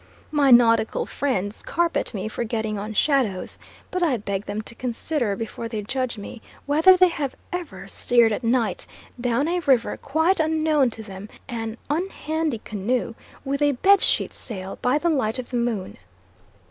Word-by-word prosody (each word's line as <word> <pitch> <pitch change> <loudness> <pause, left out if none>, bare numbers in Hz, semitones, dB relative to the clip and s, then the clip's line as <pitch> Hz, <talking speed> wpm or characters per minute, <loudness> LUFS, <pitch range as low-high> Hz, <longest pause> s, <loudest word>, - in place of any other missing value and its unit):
My 290 -3 +3
nautical 230 -2 +5
friends 215 -7 -2
carp 340 0 0
at - - -1
me 205 -2 -4
for 225 - -3
getting 220 -2 -2
on 210 +2 -5
shadows, 220 -7 0 0.3
but 365 - -2
I 305 -8 +2
beg 200 -1 -4
them 210 +1 -3
to 235 - -11
consider 245 -1 -2
before 225 +2 -5
they 220 -2 -4
judge 255 +1 -2
me, 210 +3 -8 0.2
whether 320 +6 +6
they 365 0 +6
have 285 -5 -3 0.2
ever 355 -2 -5
steered 235 -2 +3
at 215 - -2
night 235 -1 0 0.3
down 245 +4 +1
a 355 +1 0
river 265 -8 +2
quite 320 +7 +1
unknown 310 -4 +2
to 225 -1 -8
them 200 0 -9 0.2
an 225 -2 -4
unhandy 315 - -2
canoe, 225 +3 -2 0.3
with 280 +1 -2
a 290 -1 +4
bed 395 +10 +5
sheet - - +2
sail, 190 -5 -7
by 250 +3 +2
the 335 - -1
light 260 -6 +1
of 255 - -6
the 245 - 0
moon. 230 -5 -2
245 Hz, 170 wpm, -24 LUFS, 220-300 Hz, 0.3 s, whether